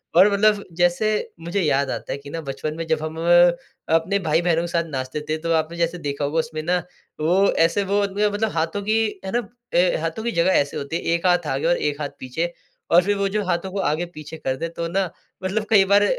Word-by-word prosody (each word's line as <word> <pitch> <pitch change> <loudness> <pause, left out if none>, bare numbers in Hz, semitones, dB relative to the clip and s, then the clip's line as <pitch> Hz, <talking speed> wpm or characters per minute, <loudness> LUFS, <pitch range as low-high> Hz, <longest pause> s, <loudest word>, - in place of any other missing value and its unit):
और 195 +4 +7
मतलब 210 0 +3
जैसे 175 +5 +2 0.3
मुझे 170 +4 -2
याद 140 -4 +1
आता - - -5
है - - -2
कि 140 0 -11
ना 165 +2 -4
बचपन 150 +1 -4
में 165 - -3
जब 160 -1 +1
हम, 160 +1 -5 0.8
अपने 185 +5 +1
भाई-बहनों 165 0 +2
के - - -3
साथ 170 0 0
नाचते 130 +1 -4
थे, 155 - +1
तो 165 +1 -3
आपने 160 +1 0
जैसे 170 +1 0
देखा 145 -1 -2
होगा 150 +3 0
उसमें 155 0 -3
ना 180 +2 +2 0.4
वो 185 +5 +3
ऐसे, 165 +5 +2
वो 200 +1 +1
म 205 +1 0
मतलब 215 +1 0
हाथों 165 +5 -1
की 220 +1 0
है 190 - -3
ना - - -1 0.4
ए 180 0 +4
हाथों 165 +7 -3
की 235 - -1
जगह 170 +1 +2
ऐसे 145 -5 +1
होती 140 +3 -4
है, - - -1
एक 170 +2 0
हाथ 175 -2 +2
आगे 135 +2 -1
और 175 - +3
एक 150 0 -2
हाथ 145 - -2
पीछे। 160 +7 -3 0.4
और 175 +2 +7
फिर 205 +2 +1
वो 200 0 +1
जो 210 +1 -1
हाथों 180 +1 -1
को 200 - -3
आगे-पीछे 155 -1 -3
कर 130 -3 -2
दे 165 - -3
तो 170 0 -4
ना, 185 +1 0 0.3
मतलब 210 +3 -1
कई 200 -3 +6
बार 200 +1 +5
170 Hz, 235 wpm, -22 LUFS, 155-195 Hz, 0.8 s, और